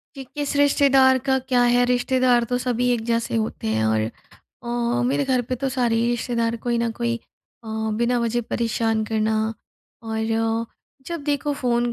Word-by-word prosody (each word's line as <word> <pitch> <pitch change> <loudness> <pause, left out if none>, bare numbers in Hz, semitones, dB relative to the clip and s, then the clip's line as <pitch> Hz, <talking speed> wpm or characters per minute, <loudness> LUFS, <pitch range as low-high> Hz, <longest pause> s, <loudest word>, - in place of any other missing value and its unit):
कि 270 - -7
किस 290 -1 -2
रिश्तेदार 275 -2 +5
का 265 +1 +1
क्या 250 -1 +1
है, 245 0 +4
रिश्तेदार 250 -1 +2
तो 245 - +1
सभी 250 0 0
एक 235 -2 0
जैसे 230 0 0
होते 220 - -2
हैं 110 0 +1
और 110 0 +2 0.6
अ, 240 0 -1
मेरे 275 +2 +1
घर 255 -2 +1
पे 255 - 0
तो 270 +3 -2
सारे 245 -3 +1
ही 235 +1 +1
रिश्तेदार 235 -1 -1
कोई 240 -1 +1
ना 235 0 0
कोई 235 0 0 0.5
अ, - - -8 0.3
बिना 240 +1 +2
वजह 235 +1 0
परेशान 225 -1 0
करना 220 0 +1 0.7
और 225 0 -1 0.4
जब 335 -3 -4
देखो 290 0 0
फ़ोन 240 -2 0
240 Hz, 170 wpm, -23 LUFS, 230-255 Hz, 0.7 s, रिश्तेदार